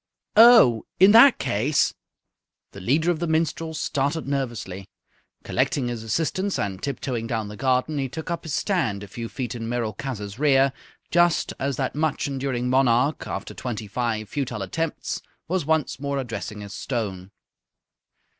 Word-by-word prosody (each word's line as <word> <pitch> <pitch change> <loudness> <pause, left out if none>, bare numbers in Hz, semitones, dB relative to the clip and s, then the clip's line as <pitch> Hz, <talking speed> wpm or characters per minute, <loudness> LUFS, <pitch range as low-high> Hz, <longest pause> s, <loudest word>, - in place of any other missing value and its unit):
"Oh, 225 - +7
in 190 +2 +8
that 235 +4 +8
case!" 135 +9 +1 0.8
The 100 - -10
leader 155 - +2
of 165 - -2
the 170 - -1
minstrels 160 0 -1
started 145 +2 -1
nervously. 115 -9 -3 0.6
Collecting 125 -4 0
his 120 -2 -4
assistants 165 - -1
and 95 -1 -3
tip 140 -3 -3
toeing 120 -4 -3
down 110 -3 -2
the 105 - -8
garden, 130 +5 0
he 135 -1 -2
took 160 +6 -6
up 170 - -2
his 160 - -3
stand 130 - 0
a - - -8
few 115 +4 -6
feet 125 -2 -4
in 115 -1 -5
Merolchazzar's 115 -2 -4
rear, 135 -2 +4 0.4
just 175 0 +3
as 140 0 -1
that 130 -2 -1
much 150 -1 -1
enduring 135 -3 -2
monarch, 130 +2 +2
after - - -5
twenty 115 -3 -5
five 110 0 -2
futile 120 -3 -3
attempts, 160 - -3 0.3
was 175 -3 -1
once 160 -4 0
more 140 0 -2
addressing 115 -4 -5
his 100 -1 -8
stone. 95 -6 -4
130 Hz, 155 wpm, -24 LUFS, 115-155 Hz, 0.8 s, in